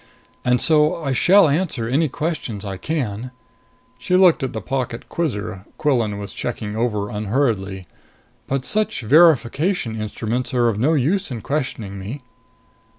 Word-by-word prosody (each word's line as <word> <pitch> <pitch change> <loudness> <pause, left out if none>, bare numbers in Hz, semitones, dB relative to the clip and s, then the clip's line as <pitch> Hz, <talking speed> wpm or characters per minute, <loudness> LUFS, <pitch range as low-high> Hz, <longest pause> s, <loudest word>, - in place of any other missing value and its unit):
And 125 0 +2
so 155 +2 +3
I 135 - -1
shall 185 +8 +5
answer 145 -6 -1
any 145 +6 +1
questions 130 -9 -4
I 95 -1 -4
can." 125 - -3 0.7
She 180 +8 0
looked 180 -4 +5
at 130 - -2
the 110 - -4
pocket 120 +2 -3
quizzer 105 - -3
Quillan 120 -9 +1
was 100 -1 -7
checking 110 -3 -4
over 105 -3 -1
unhurriedly. 105 -4 -1 0.6
"But 135 -1 -2
such 215 +4 0
verification 140 - +3
instruments 115 +4 -3
are 120 -1 +3
of 105 -2 -2
no 145 +8 +3
use 175 +8 +1
in 120 -4 -5
questioning 115 -9 -3
me." 120 +9 -7
125 Hz, 145 wpm, -21 LUFS, 110-150 Hz, 0.7 s, shall